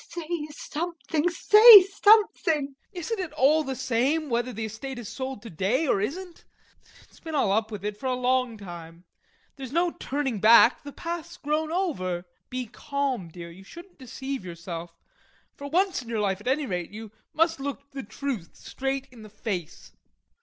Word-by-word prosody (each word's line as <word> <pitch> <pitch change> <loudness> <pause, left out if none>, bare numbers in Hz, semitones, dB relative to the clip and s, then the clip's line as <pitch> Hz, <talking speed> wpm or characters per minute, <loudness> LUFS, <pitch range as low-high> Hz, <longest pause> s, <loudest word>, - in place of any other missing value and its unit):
Say 335 -2 -4
something, 325 +1 -3
say 420 +3 +9
something. 390 -7 +3
TROFIMOV. - - -35 0.2
Isn't 395 +4 -4
it 355 -5 -4
all 305 +2 +4
the 265 -2 -4
same 260 +4 0
whether 240 +2 0
the 225 -1 -4
estate 235 +5 -7
is 240 -3 -7
sold 260 -3 -6
to 230 - -9
day 195 - 0
or 200 -8 +1
isn't? 345 - -5 0.6
It's - - -22
been 320 -1 -6
all 215 -9 +2
up 220 +2 +1
with 205 -2 -7
it 210 0 -3
for 265 - -4
a 255 - +1
long 250 -2 0
time; 170 -3 -10 0.5
there's 265 -2 -7
no 340 +3 +1
turning 270 -8 -3
back, 225 +4 +6
the 285 - -9
path's 335 +2 -6
grown 310 +2 -1
over. 185 - -2 0.2
Be 255 0 -3
calm, 275 - -3
dear, 170 0 -9
you 185 +3 -14
shouldn't 345 - -14
deceive 265 0 -6
yourself, 170 -1 -8 0.6
for 285 - -8
once 370 0 +1
in 235 - -12
your 225 -2 -1
life 200 -1 -1
at 210 - -10
any 280 +3 +1
rate 180 -6 -3
you 215 +1 -9 0.2
must 330 0 +1
look 280 0 -6
the 275 - -6
truth 245 -6 -5
straight 270 0 -4
in 240 -3 -14
the 215 - -11
face. 200 -5 -6
265 Hz, 180 wpm, -26 LUFS, 210-315 Hz, 0.6 s, say